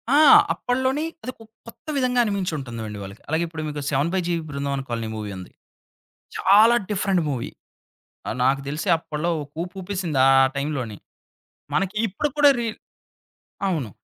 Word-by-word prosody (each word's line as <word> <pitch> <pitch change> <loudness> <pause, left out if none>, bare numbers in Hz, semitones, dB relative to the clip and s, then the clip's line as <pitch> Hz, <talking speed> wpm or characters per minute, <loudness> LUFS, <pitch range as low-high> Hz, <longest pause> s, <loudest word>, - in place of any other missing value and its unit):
ఆ! - - +6 0.4
అప్పట్లోని 260 +4 0 0.2
అదొక 245 -2 -7 0.2
కొత్త 230 - -14
విధంగా 250 -2 +1
అనిమించి 200 -4 -1
ఉంటుందండి. 115 -5 -6
వాళ్ళకి. 100 +2 -10
అలాగే 160 +2 +1
ఇప్పుడు 160 -1 -6
మీకు 145 -1 -4
'seven 140 +3 +1
by 190 - +1
G 175 - 0 0.2
Brindavana 140 -1 -2
colony' 115 -2 -3
movie 105 -2 -5
ఉంది. 90 - -10 0.9
చాలా 215 +5 +6 0.2
డిఫరెంట్ 195 -3 +1
మూవీ. 125 -4 -3 0.8
ఆహ్, - - -2
నాకు 135 +1 +2
తెలిస 150 +6 -3
అప్పట్లో 160 +1 -3
ఒక 140 - -14
ఊపు 180 +2 -10
ఉపేసింది 180 -6 -2
ఆ - - +6 0.2
టైమ్లోని. 140 -7 -3 0.8
మనకి 195 +2 0
ఇప్పుడు 250 +10 -2
కూడా 290 -1 +7
రీ 230 - -1 1.0
అవును. 150 - -1
160 Hz, 150 wpm, -23 LUFS, 135-200 Hz, 1.0 s, కూడా